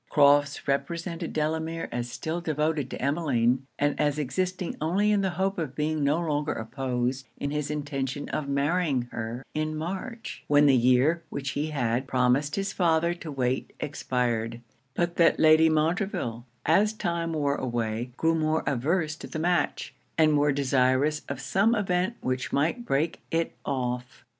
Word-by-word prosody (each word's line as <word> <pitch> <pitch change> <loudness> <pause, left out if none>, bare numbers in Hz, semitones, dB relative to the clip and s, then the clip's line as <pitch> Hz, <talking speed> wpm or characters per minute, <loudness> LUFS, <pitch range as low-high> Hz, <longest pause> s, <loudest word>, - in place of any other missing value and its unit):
Crofts 145 -1 +4
represented 165 +5 -2
Delamere 160 +2 -2
as 120 0 -3
still 160 +6 -3
devoted 155 -3 -1
to - - -6
Emmeline; 135 -3 +1
and 145 0 0
as 150 -1 +1
existing 180 +5 -2
only 195 +7 +2
in 205 -1 +3
the 190 - +1
hope 195 0 0
of 150 -6 -4
being 155 0 0
no 145 +3 +3
longer 150 -3 -1
opposed 125 +2 -2
in 140 - -3
his 150 -1 -2
intention 145 -2 -3
of 140 -2 -3
marrying 140 -1 +1
her 115 +3 -5
in 155 0 -1
March, 195 +9 -5
when 145 0 +5
the 140 -2 +6
year 130 +7 +4
which 135 -1 -3
he 145 +3 -2
had 130 -3 -1
promised 130 +3 +2
his 195 -1 -2
father 170 -1 +2
to 170 -3 -8
wait 130 -2 -1
expired; 120 -6 -1 0.4
but 175 0 -1
that 170 - +4
Lady 155 +1 +6
Montreville, 155 - -1 0.2
as 205 +7 +4
time 170 -5 -2
wore 145 -3 +1
away, 120 -2 -2
grew 165 0 +2
more 160 0 +1
averse 155 +5 0
to - - -8
the - - -6
match, 175 +2 0 0.2
and 155 -1 +5
more 145 0 +3
desirous 135 +2 +2
of 140 -2 -4
some 200 +11 +2
event 190 +1 0
which 130 0 -2
might 170 - 0
break 145 +5 0
it 165 0 0
off. 125 -1 -3
150 Hz, 160 wpm, -27 LUFS, 130-165 Hz, 0.4 s, the